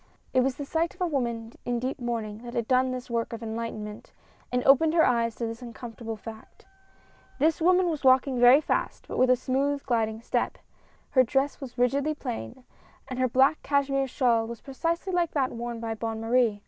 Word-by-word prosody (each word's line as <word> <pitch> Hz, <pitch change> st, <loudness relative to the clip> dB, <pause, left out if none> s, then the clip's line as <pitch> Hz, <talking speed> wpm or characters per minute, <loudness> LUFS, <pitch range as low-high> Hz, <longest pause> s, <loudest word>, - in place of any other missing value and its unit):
It -, -, +4 dB
was 255 Hz, 0 st, +1 dB
the 285 Hz, -, -6 dB
sight 330 Hz, +4 st, -1 dB
of -, -, -17 dB
a -, -, +3 dB
woman 235 Hz, -7 st, -2 dB
in 245 Hz, 0 st, -1 dB
deep 255 Hz, +3 st, -3 dB
mourning 225 Hz, -3 st, -3 dB
that 240 Hz, +1 st, -9 dB
had 235 Hz, -2 st, -1 dB
done 255 Hz, 0 st, +3 dB
this 255 Hz, 0 st, -5 dB
work 235 Hz, -1 st, -2 dB
of 230 Hz, 0 st, -6 dB
enlightenment, 220 Hz, -2 st, -6 dB, 0.4 s
and 250 Hz, 0 st, 0 dB
opened 310 Hz, +4 st, +5 dB
her 325 Hz, -, +6 dB
eyes 230 Hz, -2 st, +1 dB
to 235 Hz, -, -3 dB
this 225 Hz, +1 st, -6 dB
uncomfortable 230 Hz, -1 st, -7 dB
fact. 220 Hz, 0 st, -12 dB, 0.7 s
This 315 Hz, +3 st, +2 dB
woman 365 Hz, +2 st, +4 dB
was 315 Hz, -4 st, -2 dB
walking 260 Hz, 0 st, +4 dB
very 245 Hz, +4 st, +7 dB
fast, -, -, -2 dB
but -, -, -4 dB
with 255 Hz, -, +4 dB
a 255 Hz, -, +6 dB
smooth, 275 Hz, +3 st, -1 dB
gliding 225 Hz, -3 st, -1 dB
step. -, -, -1 dB, 0.5 s
Her 260 Hz, -, +6 dB
dress 270 Hz, +4 st, 0 dB
was 260 Hz, -2 st, -8 dB
rigidly 275 Hz, +5 st, +1 dB
plain; 110 Hz, -, -6 dB, 0.5 s
and 255 Hz, -1 st, -4 dB
her 255 Hz, -, +3 dB
black 265 Hz, +5 st, +3 dB
cashmere 275 Hz, -1 st, +1 dB
shawl 235 Hz, -3 st, +1 dB
was 235 Hz, -1 st, -7 dB
precisely 335 Hz, +7 st, -3 dB
like 345 Hz, -2 st, +1 dB
that 270 Hz, -3 st, +1 dB
worn 235 Hz, 0 st, -5 dB
by 225 Hz, -1 st, -3 dB
Bonne 225 Hz, 0 st, -4 dB
Marie. 225 Hz, -2 st, +2 dB
250 Hz, 200 wpm, -27 LUFS, 230-275 Hz, 0.7 s, very